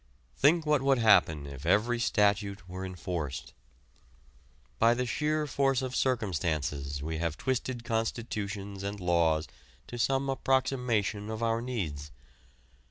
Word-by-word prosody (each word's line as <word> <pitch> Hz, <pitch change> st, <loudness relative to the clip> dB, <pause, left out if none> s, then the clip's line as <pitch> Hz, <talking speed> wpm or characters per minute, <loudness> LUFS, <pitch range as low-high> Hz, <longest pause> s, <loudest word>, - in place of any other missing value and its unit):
Think 160 Hz, +3 st, +4 dB
what 150 Hz, -3 st, +3 dB
would 135 Hz, 0 st, +3 dB
happen 90 Hz, -10 st, +4 dB
if 70 Hz, -1 st, -9 dB
every 105 Hz, +8 st, +2 dB
statute 100 Hz, -4 st, +1 dB
were 95 Hz, +1 st, -6 dB
enforced. 90 Hz, -5 st, -5 dB, 1.3 s
By 115 Hz, +1 st, +5 dB
the 125 Hz, +1 st, -1 dB
sheer 150 Hz, +4 st, 0 dB
force 135 Hz, -2 st, +1 dB
of 130 Hz, 0 st, -4 dB
circumstances 75 Hz, -, -1 dB
we 80 Hz, +1 st, -3 dB
have 85 Hz, -2 st, -2 dB
twisted 130 Hz, -, -2 dB
constitutions 110 Hz, -4 st, -3 dB
and 100 Hz, +1 st, -4 dB
laws 85 Hz, -3 st, +2 dB, 0.4 s
to 120 Hz, -, -8 dB
some 135 Hz, +3 st, +1 dB
approximation 125 Hz, -6 st, 0 dB
of 110 Hz, +1 st, -4 dB
our 115 Hz, 0 st, +1 dB
needs. 85 Hz, -, -4 dB
105 Hz, 125 wpm, -30 LUFS, 85-125 Hz, 1.3 s, By